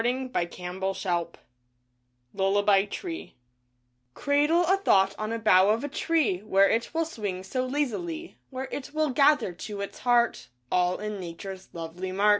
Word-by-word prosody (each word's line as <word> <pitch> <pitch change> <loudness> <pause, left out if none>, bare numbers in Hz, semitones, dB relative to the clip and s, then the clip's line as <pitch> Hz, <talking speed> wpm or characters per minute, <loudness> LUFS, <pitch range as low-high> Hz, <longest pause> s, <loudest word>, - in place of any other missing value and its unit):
D 240 - +3
A - - +1
v 260 0 -5
DRE 250 - 0
A 170 - -1 0.2
1,1 190 +1 -2
S 170 -2 -1 0.9
LULLABY 200 +1 +3
TREE 335 - -6 0.8
Cradle 295 +5 +2
a 380 +3 +3
thought 195 - +3
on 215 +1 -3
a 230 - -1
bough 200 -3 +5
of 225 +4 +1
a - - -1
tree, 300 - +1
Where 195 -1 +3
it 230 +3 0
will 330 0 0
swing 205 - -4
so 255 +6 -2
lazily, 315 +5 -3
Where 265 0 -5
it 285 +2 -6
will 310 -2 +1
gather 280 -6 +3
to 200 +3 -6
its 200 - -6
heart 240 -1 +2 0.2
All 180 0 +2
in 210 -1 -5
Nature's 185 +2 -8
lovely 170 +3 -6
mart. 200 +3 +2
215 Hz, 175 wpm, -27 LUFS, 190-285 Hz, 0.9 s, bough